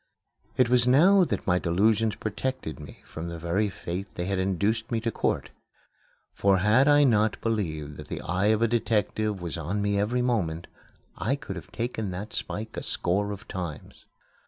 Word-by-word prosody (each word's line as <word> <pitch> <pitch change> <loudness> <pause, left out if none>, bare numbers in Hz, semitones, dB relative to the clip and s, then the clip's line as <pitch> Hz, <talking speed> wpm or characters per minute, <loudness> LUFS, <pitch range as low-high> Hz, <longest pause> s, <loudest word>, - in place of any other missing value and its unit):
It 130 - +5
was 125 0 +4
now 180 +10 +6
that - - -3
my 90 -1 +3
delusions 105 +5 +2
protected 110 - -4
me 75 - -12
from 80 +1 -7
the 85 - -5
very 85 +6 0
fate 95 +1 -5
they 90 - -3
had 95 0 -1
induced 100 +4 0
me 115 - +1
to 115 0 -2
court. - - -1 0.8
For 100 -1 +3
had 110 +9 +4
I 145 0 +6
not 110 -5 +3
believed 80 -10 -2
that - - -9
the - - -5
eye 95 +4 0
of 110 +1 +3
a - - +4
detective 110 -3 0
was 85 -1 -4
on 90 +7 -2
me 100 0 +1
every 120 +5 +1
moment, 90 -10 0 0.5
I 125 +6 +1
could 105 -9 -7
have 85 -5 -9
taken 115 -3 -3
that 95 +4 -6
spike 110 +2 -4
a - - -3
score 100 +4 0
of 100 - -8
times. 85 -6 -7
105 Hz, 180 wpm, -27 LUFS, 90-115 Hz, 0.8 s, now